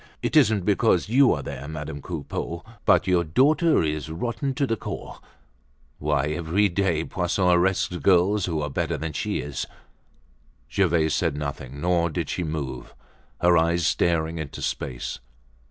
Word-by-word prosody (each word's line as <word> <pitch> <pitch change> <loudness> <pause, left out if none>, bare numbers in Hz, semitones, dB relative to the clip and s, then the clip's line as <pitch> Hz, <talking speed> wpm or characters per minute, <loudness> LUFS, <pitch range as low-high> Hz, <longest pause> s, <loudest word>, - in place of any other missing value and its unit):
"It - - -1
isn't 110 - +4
because 105 -3 +2
you 130 +2 +5
are 70 -5 -1
there, 70 0 -6
Madame 75 -1 -6
Coupeau, 85 +1 -5 0.2
but - - +4
your 90 -2 +3
daughter 145 - +3
is 75 -1 -2
rotten 120 - -3
to 140 - +1
the 115 - 0
core. - - -7 0.8
Why, 75 -2 +1
every 85 +6 +1
day 85 -3 0
Poisson 90 +1 0
arrests 90 +1 +2
girls 95 +4 +3
who 80 -4 -2
are 75 - -2
better - - -1
than 80 -1 -4
she - - -2
is." 75 -3 -4 1.1
Gervaise 85 -5 +2
said 80 -5 0
nothing, 70 -2 -5
nor 85 +1 +1
did 75 - -3
she 90 - -2
move; 70 -6 -5 0.5
her 90 0 +5
eyes 85 0 +2
staring 80 0 +1
into 80 -4 -6
space. 60 -2 -4
85 Hz, 155 wpm, -25 LUFS, 75-95 Hz, 1.1 s, you